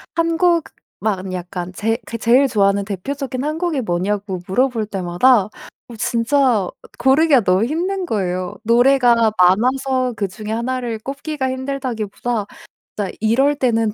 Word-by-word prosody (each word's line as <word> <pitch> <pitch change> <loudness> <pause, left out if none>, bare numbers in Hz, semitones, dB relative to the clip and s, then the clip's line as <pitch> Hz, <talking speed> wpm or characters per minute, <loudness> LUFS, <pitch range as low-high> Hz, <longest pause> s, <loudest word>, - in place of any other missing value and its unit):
1 330 0 +1
곡만 220 - -1
약간 180 0 -5
제 225 +4 -1
제 230 - -5
제일 245 +5 +4
좋아하는 200 -2 +2
대표적인 255 +7 -4
1 305 +1 -2
곡이 330 -6 -1
뭐냐고 190 0 -2
물어볼 230 +1 0
때마다 195 +4 +2
어 - - -12 0.5
진짜 235 -3 +1 0.3
고르기가 275 +1 +4
너무 185 +3 +3
힘든 360 +8 -1
거예요. 185 - -2
노래가 235 -1 +4
많아서 255 +7 +2
그중에 210 +2 -4
1 250 +3 -2
를 230 -2 -4
꼽기가 275 +2 -4
힘들다기보다 245 -5 -3 0.5
진짜 200 -3 -2
이럴 265 +7 +3
때는 225 -5 +1
235 Hz, 285 characters per minute, -19 LUFS, 200-270 Hz, 0.5 s, 제일